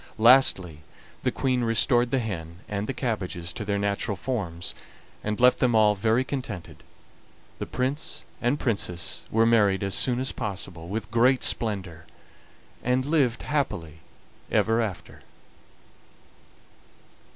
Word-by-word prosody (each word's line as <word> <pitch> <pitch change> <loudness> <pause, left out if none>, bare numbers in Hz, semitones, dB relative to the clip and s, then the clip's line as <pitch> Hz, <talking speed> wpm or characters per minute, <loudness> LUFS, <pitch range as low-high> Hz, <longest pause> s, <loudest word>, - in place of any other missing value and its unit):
Lastly, 110 - +5 0.4
the - - 0
Queen 130 -2 0
restored 120 +2 +3
the 135 - +1
hen 85 -7 -5
and 105 0 -3
the - - -1
cabbages 95 -9 -3
to - - -5
their 100 0 -1
natural 100 0 -1
forms, 95 -8 -3 0.5
and 105 0 -2
left 125 +1 +5
them 120 -2 +2
all 105 -1 +5
very 110 +5 +1
contented. 120 - -6 0.8
The - - -4
Prince 130 +5 -2 0.2
and 125 +4 +1
Princess 100 -7 -1
were 115 +1 +3
married 105 -4 +3
as 100 -1 -1
soon 125 +2 +1
as 130 +1 -1
possible 95 -6 -5
with 110 +3 -4
great 125 +3 +3
splendor, 95 -8 -2 0.8
and 125 +1 +1
lived 140 -6 +1
happily 85 - -2 0.5
ever 115 +1 +2
after. 105 -6 -5
110 Hz, 130 wpm, -26 LUFS, 95-125 Hz, 0.8 s, Lastly